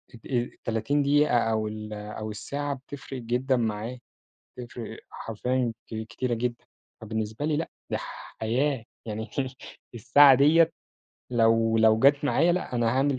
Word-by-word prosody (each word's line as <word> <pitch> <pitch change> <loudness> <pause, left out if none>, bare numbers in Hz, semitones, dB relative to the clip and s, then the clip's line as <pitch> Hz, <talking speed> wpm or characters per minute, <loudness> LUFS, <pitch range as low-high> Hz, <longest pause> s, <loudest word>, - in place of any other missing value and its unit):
ات 115 - -16
آآ - - -10
ال30 120 +3 -1
دقيقة 145 -2 +4
أو 110 -2 +1
ال 105 0 -6
أو 105 +1 -6
الساعة 140 +7 -3
بتفرِق 135 -1 -8
جدًا 125 +3 0
معايا. 115 +2 -2 0.6
بتفرِق 120 -2 -7
حرفيًا 125 +2 -2
ك - - -9
كتيرة 120 +1 -2
جدًا، 120 +1 -3 0.4
فبالنسبة 110 +3 -4
لي 155 0 +1
لأ، 160 - -3 0.2
دي - - 0 0.4
حياة 125 +3 0 0.2
يعني 110 0 -5 0.6
الساعة 135 +4 +7
دِيّة 155 +5 +5 0.6
لو 115 -1 +3
لو 110 0 +5
جات 140 +4 +4
معايا 165 +4 +3
لأ، 180 -7 -2
أنا 120 -1 +1
هاعمل 135 0 +2
120 Hz, 140 wpm, -27 LUFS, 110-140 Hz, 0.6 s, الساعة